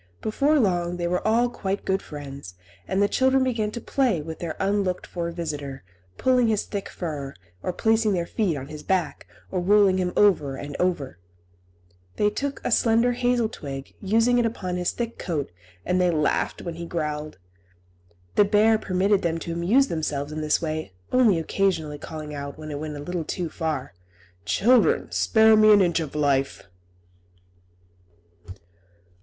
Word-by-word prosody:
Before 285 +8 +2
long 175 -5 +1
they 175 -1 -1
were 180 +1 0
all 235 +3 +3
quite 200 -4 -4
good 190 0 0
friends, 140 - -9 0.3
and 195 +1 +1
the - - +4
children 265 +3 +2
began 230 -5 0
to 225 - -6
play 240 - +1
with 160 +1 -7
their 165 -2 -4
unlooked 195 -2 0
for 170 -1 -4
visitor, 145 - -5 0.3
pulling 250 -2 +3
his 215 -2 +1
thick 200 -2 -5
fur, 145 -6 -5 0.3
or - - -2
placing 220 +3 +2
their 175 -2 -1
feet 180 -5 -1
on 130 - -6
his 150 0 -8
back, 180 -4 -1 0.2
or 185 - -1
rolling 195 0 +4
him 180 -1 0
over 160 -10 +3
and 145 +1 -7
over. 150 - -1 1.0
Then - - +1
they - - +5
took 280 0 -3
a - - -1
slender 230 +1 +3
hazel 245 -1 +1
twig, 135 -9 -8
using 230 +5 +3
it 240 - +2
upon 185 -5 -4
his 180 -1 0
thick 235 -1 -4
coat, 155 -6 -3 0.3
and 180 0 +1
they 180 - +3
laughed 155 -3 0
when 170 - -4
he 170 +1 -7
growled. 150 -2 -4 1.0
The - - +5
bear 215 +2 +4
permitted 195 +1 +1
them 165 -1 0
to 165 +1 -5
amuse 205 +12 +3
themselves 150 - -3
in 155 0 -4
this 150 0 +2
way, 155 - -4 0.2
only 235 -8 +4
occasionally 160 -3 -1
calling 155 -1 -7
out, 140 -1 -6
when 155 0 -7
it 145 - -4
went 155 0 -5
a - - -7
little 175 +2 -3
too 170 +2 -3
far, 155 -6 -3 0.5
"Children, 245 +3 +3
spare 220 -1 +5
me 215 0 +6
an 205 - +7
inch 175 -3 +2
of 155 -3 -5
life!" 140 -2 0
180 Hz, 170 wpm, -24 LUFS, 155-215 Hz, 1.0 s, an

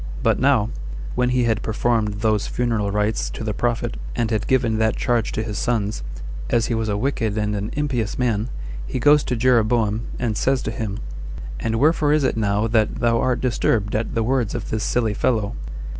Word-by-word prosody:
But - - +3
now, 125 -5 +3 0.4
when 125 0 +1
he 125 0 +2
had 110 -2 +1
performed 110 -2 0
those 110 -2 +1
funeral 115 -4 0
rites 105 +2 0
to - - -6
the 110 -1 -1
prophet, 120 +1 -1 0.2
and 120 -1 0
had 110 -2 0
given 120 -4 +2
that 110 0 +2
charge 120 -3 0
to 110 - -1
his 110 -1 -4
sons, 110 -4 0 0.5
as 115 -1 +2
he 120 - -1
was 110 -1 -1
a 100 - 0
wicked 110 -3 -1
and 105 -1 0
an 100 +1 -3
impious 130 -7 -1
man, 115 -2 0 0.4
he - - -3
goes 145 +3 +5
to 125 - -1
Jeroboam, 115 -2 +2
and 115 -3 -1
says 135 +3 +1
to 110 - -2
him, 110 -3 -3 0.6
"And 110 - -1
wherefore 150 +3 +3
is 155 -1 +3
it 130 - +1
now 105 -1 +1
that 110 -1 +2
thou 115 -1 +2
art 125 -1 +1
disturbed 115 -4 +1
at 110 +2 -2
the 115 - +2
words 120 -2 0
of 120 - -5
this 110 0 -1
silly 115 -3 +1
fellow?" 110 -2 0
115 Hz, 200 wpm, -22 LUFS, 110-125 Hz, 0.6 s, goes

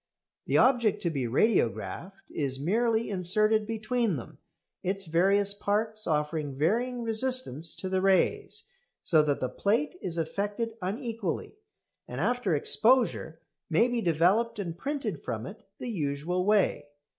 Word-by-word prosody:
The - - +3
object 240 -5 +3
to 170 - 0
be 135 -5 -2
radiographed 130 - 0
is 135 -3 -2
merely 225 +8 +1
inserted 210 +3 +2
between 225 -2 0
them, 125 - -9 0.4
its 195 +1 -2
various 195 +5 +3
parts 215 +2 -1
offering 150 -2 -1
varying 235 - 0
resistance 225 - -1
to 190 - -5
the 185 0 0
rays, 195 - +1 0.4
so 160 -3 +5
that 145 -2 0
the 130 - -1
plate 220 - 0
is 170 -1 -4
affected 205 +7 -2
unequally, 225 - -3 0.5
and - - -6
after 245 -9 +1
exposure 220 - +2 0.3
may 175 +9 +4
be 240 -1 -1
developed 180 +7 +2
and 175 -5 -4
printed 280 - -4
from - - -4
it - - -11
the 245 - -5
usual 165 +1 -2
way. 210 -7 +2
195 Hz, 135 wpm, -28 LUFS, 165-230 Hz, 0.5 s, so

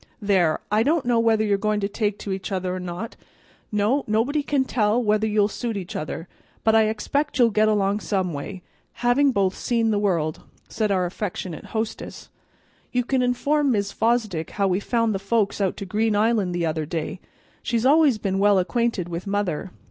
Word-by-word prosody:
"There, 185 -6 +2
I 210 +1 +3
don't 300 +3 +1
know 240 -1 +3
whether 225 -1 +3
you're 200 -1 +1
goin' 215 0 0
to 200 - 0
take 205 0 -1
to 200 - -6
each 190 +2 -4
other 185 -1 -1
or 185 - -3
not; 180 +5 -6 0.6
no, 215 +7 +1
nobody 235 +8 +1
can't 280 -2 0
tell 215 0 +2
whether 215 -2 +1
you'll 210 -1 +3
suit 225 0 -4
each 185 -3 -6
other, 160 +2 -5 0.4
but 220 - +4
I 220 0 +5
expect 280 +8 -1
you'll 240 -3 +5
get 215 +1 +3
along 205 -1 +1
some 190 -5 -1
way, 175 +6 -6 0.3
both - - -21
having 245 -6 +3
seen 230 +2 0
the 205 - +1
world," 170 -6 0 0.3
said 215 -2 -1
our 185 -2 +2
affectionate 180 -2 -5
hostess. 220 0 -5 0.6
"You 250 -1 +1
can 260 0 +1
inform 280 +3 +1
Mis' 200 -1 -1
Fosdick 220 -8 0
how 200 -1 +2
we 185 0 +1
found 230 +1 0
the 195 - -2
folks 205 0 0
out 190 -2 0
to 200 - -5
Green 215 +3 0
Island 210 -4 +1
the 175 -1 0
other 155 -1 -2
day. 165 +3 -4 0.4
She's 235 0 -1
always 290 -3 +5
been 195 -2 -1
well 205 0 +4
acquainted 220 -1 0
with 175 +2 -5
mother. 195 -3 -1
210 Hz, 195 wpm, -23 LUFS, 190-230 Hz, 0.6 s, I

